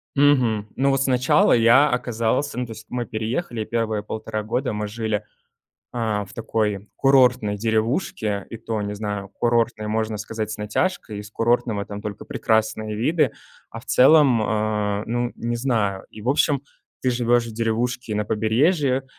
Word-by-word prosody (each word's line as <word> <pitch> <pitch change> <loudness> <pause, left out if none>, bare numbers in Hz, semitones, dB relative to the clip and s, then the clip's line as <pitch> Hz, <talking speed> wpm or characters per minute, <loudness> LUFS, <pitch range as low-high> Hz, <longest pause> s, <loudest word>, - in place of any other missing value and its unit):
Мгм. 125 -7 +3
Ну, 135 +1 +3
вот 135 0 +2
сначала 125 -1 +3
я 120 +5 +6
оказался, 125 +2 -1
ну, 125 - -1
то 115 - -10
есть, 110 0 -10
мы 125 -1 -3
переехали, 115 +3 -3
и - - -3
первые 110 -2 -1
1,5 110 0 -5
года 125 +5 -1
мы 105 -1 -3
жили, 110 0 -2 0.8
э, 110 -4 -1
в 95 - -15
такой 105 -3 -2
курортной 125 -6 +4
деревушке, 110 - -1
и 115 - -7
то, 110 -1 -3
не 105 0 -3
знаю, 105 -2 -4
курортной, 115 -1 0
можно 110 0 -1
сказать, 110 0 -4
с 110 - -5
натяжкой, 105 - -2
из 105 0 -10
курортного 115 -2 0
там 105 0 -7
только 105 -2 -6
прекрасные 110 -1 0
виды, 155 +10 +1 0.4
а 115 - -8
в - - -21
целом, 135 -4 +5
э, 105 -1 -1
ну, 120 +1 -1
не 120 0 -3
знаю. 110 -6 0
И, 110 - -11
в 110 - -4
общем, 140 0 +2 0.4
ты 130 - +1
живешь 120 -1 +2
в 115 - -7
деревушке 115 +1 -1
на 105 0 0
побережье, 130 - +1
115 Hz, 165 wpm, -23 LUFS, 105-125 Hz, 0.8 s, я